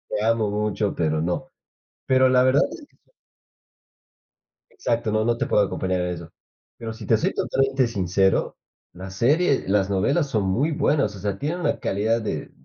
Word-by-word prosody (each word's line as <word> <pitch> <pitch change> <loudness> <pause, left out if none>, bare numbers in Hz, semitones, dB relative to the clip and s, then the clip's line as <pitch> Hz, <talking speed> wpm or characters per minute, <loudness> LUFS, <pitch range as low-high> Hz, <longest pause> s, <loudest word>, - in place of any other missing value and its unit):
te 105 - -1
amo 115 -2 +1
mucho, 105 0 -1
pero 80 -1 0
no". 90 +2 -2 0.6
Pero 130 0 +4
la 130 0 +4
verdad 130 +2 +4
es 295 - -10
que - - -33
son - - -35 1.6
Exacto, 120 - -2
no, 110 0 +1
no, 120 0 +1
te - - -1
puedo 105 - +3
acompañar 95 -2 -2
en 90 - -1
eso, 85 -1 -9 0.5
pero 115 -1 -6
si 110 -2 -10
te - - +3
soy - - -1
totalmente 135 -1 +1
sincero, 95 -3 0 0.4
la 95 +2 -8
serie 140 - +1
las 95 0 +1
novelas 105 +9 +1
son 110 -6 0
muy 120 +12 0
buenas, 140 -7 +1
o - - -10
sea, 100 0 -3
tienen 160 - -3
una - - 0
calidad 110 +4 0
de 110 - -3
n - - -18
110 Hz, 185 wpm, -23 LUFS, 95-130 Hz, 1.6 s, Pero